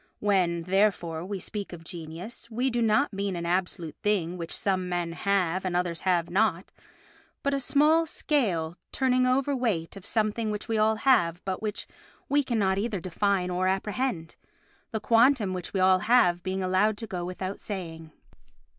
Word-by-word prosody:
When, 180 -5 +1
therefore, 180 -3 +1
we 195 +1 -4
speak 205 +1 -5
of 170 -2 -9
genius 170 +7 -8
we 250 +3 0
do 240 0 0
not 225 +4 +2
mean 195 -1 -2
an 170 0 -4
absolute 175 -2 -2
thing 185 -5 0
which 170 -2 -6
some 185 -2 0
men 175 -1 -1
have 185 0 0
and 185 -2 -2
others 175 -2 -1
have 175 -3 +1
not, 190 -2 0 0.7
but 280 - +1
a 275 - +1
small 305 +5 +3
scale 190 - 0 0.2
turning 255 -1 +2
overweight 255 - 0
of 195 - -10
a - - -8
something 220 0 0
which 210 0 -4
we 225 -2 0
all 220 +1 +3
have 175 -9 +3
but 190 -1 -3
which 215 -1 -3 0.4
we 285 +1 +2
cannot 200 -6 +1
either 210 -2 -2
define 185 +1 0
or 185 +1 0
apprehend—the 205 +1 -4
quantum 230 -3 +4
which 180 -2 -5
we 195 - -1
all 185 0 +5
have 180 -6 +3
being 190 +1 -2
allowed 190 +3 +2
to 225 - -5
go 185 -5 -4
without 185 +2 -5
saying. 165 -5 -6
195 Hz, 170 wpm, -27 LUFS, 175-225 Hz, 0.7 s, all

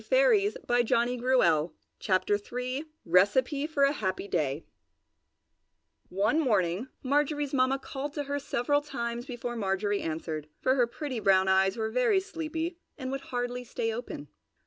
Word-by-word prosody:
RECIPE - - -22 0.6
FOR - - -2 0.7
A 160 0 +3 2.2
HAPPY 190 -8 -3
DAY 150 -4 -1 1.4
One 205 - +2
morning 205 - +1 0.2
Marjorie's 290 +1 +1
Mamma 260 0 +3
called 275 +1 -6
to 295 - -2
her 285 0 -2
several 285 +1 0
times 240 -4 -4
before 240 -2 -4
Marjorie 205 -1 0
answered, 155 -1 -4
for 260 - +2
her 250 -3 +3
pretty 260 0 -4
brown 190 -2 +4
eyes 190 +2 +3
were 220 -1 -2
very 250 - +3
sleepy 330 -2 -4 0.2
and 260 -3 -4
would 275 0 -3
hardly 245 0 -3
stay 455 - -2
open. 485 +1 -6
245 Hz, 125 wpm, -29 LUFS, 195-285 Hz, 2.2 s, brown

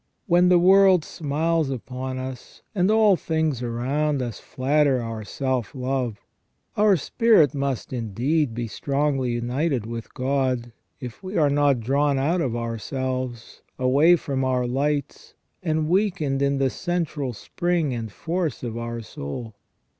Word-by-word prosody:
When 180 -3 +4
the 180 - +6
world 190 -1 +5
smiles 160 +1 -1
upon 130 0 -5
us, 130 -1 -8
and 185 -2 +2
all 215 -2 +5
things 160 -6 -1
around 135 +5 -1
us 120 -5 -4
flatter 140 0 +1
our 115 -2 -5
self 130 +1 -2
love, 130 -4 -2 0.6
our 205 -2 +4
spirit 165 - +3
must 140 -3 -3
indeed 125 +4 0
be 120 -1 -3
strongly 135 +1 -1
united 125 +1 -1
with 115 0 -6
God, 130 -2 0 0.3
if 125 - -8
we 190 +1 -5
are 150 -3 +3
not 140 -3 +3
drawn 140 +4 +1
out 160 +7 +1
of 125 -6 -1
ourselves, 120 +1 -4 0.2
away 140 +7 +5
from 135 -5 -2
our 130 -1 +1
lights, 140 +4 -2 0.3
and 155 -3 0
weakened 165 -7 +1
in 140 0 +2
the 135 -1 +1
central 165 -6 -2
spring 165 +5 -1
and 115 -3 -5
force 165 - -3
of 115 -1 -4
our 115 0 -4
soul. 110 - -7
135 Hz, 140 wpm, -24 LUFS, 125-160 Hz, 0.6 s, the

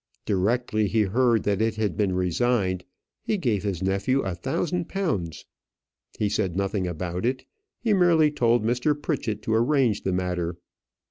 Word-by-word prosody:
Directly 110 +2 +1
he 110 +2 +2
heard 115 +2 +2
that 100 0 0
it 110 0 +1
had 105 -6 -1
been 95 -1 0
resigned, 95 0 0 0.4
he 215 - -1
gave 115 - 0
his 95 -4 -3
nephew 100 +8 +1
a 95 - -2
thousand 170 - -2
pounds. 105 - -2 0.7
He 105 - +1
said 95 -4 -1
nothing 100 -1 -1
about 90 +1 -4
it; 130 +2 -1 0.3
he 225 -3 +1
merely 170 -5 +4
told 120 -5 +2
Mr. 125 +6 +1
Pritchett 125 -9 -2
to 110 - -1
arrange 120 -2 +2
the 95 - -1
matter. 90 -2 -2
110 Hz, 155 wpm, -25 LUFS, 95-125 Hz, 0.7 s, merely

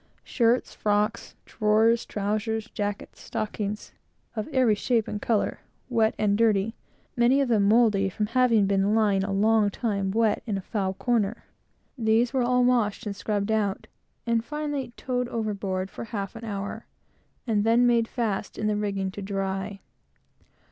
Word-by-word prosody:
Shirts, 240 0 +1
frocks, 210 0 -1
drawers, 220 +2 +2
trowsers, 215 +2 -2
jackets, 205 -1 -4
stockings, 210 -2 -4 0.4
of 215 -2 -3
every 260 -6 +3
shape 225 +1 0
and 205 - -4
color, 220 -3 0 0.3
wet 225 -3 +2
and 205 -1 +2
dirty 220 -1 +2 0.4
many 245 +3 +4
of 275 -3 +1
them 210 -4 +3
mouldy 210 -3 +4
from 210 +3 -2
having 230 -2 +3
been 200 +2 +2
lying 205 -3 +2
a 195 - -2
long 210 +1 +3
time 200 -2 -2
wet 220 +1 +1
in 205 -3 -1
a - - -4
foul 190 -3 -2
corner 230 -1 0 0.6
these 230 +2 +2
were 260 - +2
all 250 +1 +3
washed 235 -5 +1
and 205 -1 -3
scrubbed 205 +1 -2
out, 205 -3 0 0.4
and 230 -1 +1
finally 290 -2 -4
towed 250 -1 -2
overboard 200 -5 -3
for - - -7
half 200 -2 -5
an 225 - -9
hour; 200 +1 -5 0.6
and 215 -4 +1
then 230 +2 +4
made 235 -2 +3
fast 220 -5 -3
in 215 - -2
the 210 0 +1
rigging 200 -2 -2
to 200 - -8
dry. 195 0 -3
215 Hz, 155 wpm, -26 LUFS, 200-230 Hz, 0.6 s, many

